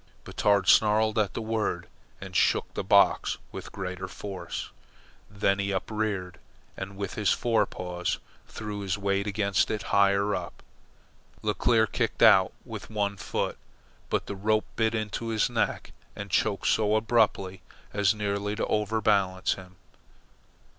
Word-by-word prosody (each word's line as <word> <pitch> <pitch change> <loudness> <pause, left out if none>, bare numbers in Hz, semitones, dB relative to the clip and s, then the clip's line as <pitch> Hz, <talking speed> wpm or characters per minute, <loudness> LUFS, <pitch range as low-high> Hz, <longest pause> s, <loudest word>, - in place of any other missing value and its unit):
Batard 100 -3 +1
snarled 110 0 +4
at 100 -3 0
the 115 - -3
word 110 -6 -2 0.3
and - - -9
shook - - +2
the - - -3
box - - +4
with - - -8
greater 95 -1 -5
force. 95 -3 -6 0.6
Then 100 -1 +1
he 100 0 -1
upreared, 100 -2 -2 0.4
and 95 +1 -7
with 100 -1 -4
his 105 -3 0
fore 115 -2 +2
paws 90 -1 -3 0.3
threw 105 -1 -6
his 95 -2 -2
weight 100 0 0
against 100 -2 +1
it 110 -2 -2
higher 100 +1 +4
up. - - -5 0.8
Leclere 110 +2 +3
kicked - - -1
out - - +7
with - - -8
one 100 -2 -1
foot, - - -3 0.5
but - - 0
the 100 - -5
rope 110 +2 +1
bit 110 0 +1
into 110 +1 -3
his 115 +1 +1
neck 115 -3 -1 0.2
and 100 0 -7
checked 105 -2 +1
so 110 -1 +3
abruptly 110 -4 +1 0.3
as 100 +1 +2
nearly 105 0 -2
to - - -1
overbalance 105 -3 +1
him. 95 -1 -12
100 Hz, 140 wpm, -27 LUFS, 95-110 Hz, 0.8 s, out